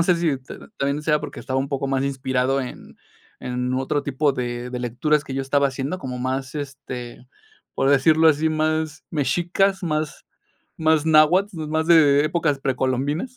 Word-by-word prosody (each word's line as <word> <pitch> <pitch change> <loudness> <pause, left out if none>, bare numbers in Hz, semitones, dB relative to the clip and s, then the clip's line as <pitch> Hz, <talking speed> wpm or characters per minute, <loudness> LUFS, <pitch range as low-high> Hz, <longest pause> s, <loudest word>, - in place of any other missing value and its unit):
no - - +5
sé 180 +1 +3
si 165 -5 0
ta 130 - -12
también 140 +2 -1
sea 150 -1 +2
porque 150 - -7
estaba 130 0 -2
un 135 +1 -2
poco 140 -1 -2
más 135 0 0
inspirado 130 -1 0
en 125 - -9 0.4
en 125 0 -3
otro 135 +3 -1
tipo 140 +1 0
de 120 -1 -4
de 125 - -4
lecturas 135 +5 0
que 140 - -8
yo 135 - -1
estaba 140 +1 +2
haciendo, 135 +7 -4
como 125 -4 -6
más, 130 +2 -3
este, 130 -4 -7 0.5
por 135 - +1
decirlo 160 +3 +5
así, 155 +1 +2
más 155 0 -1
mexicas, 175 +6 0
más 155 -3 -3 0.5
más 160 -1 +2
náhuatl, 160 +2 +3
más 160 +1 -1
de 145 -4 +5
épocas 155 -3 0
precolombinas. 135 - -1
145 Hz, 170 wpm, -22 LUFS, 130-155 Hz, 0.5 s, no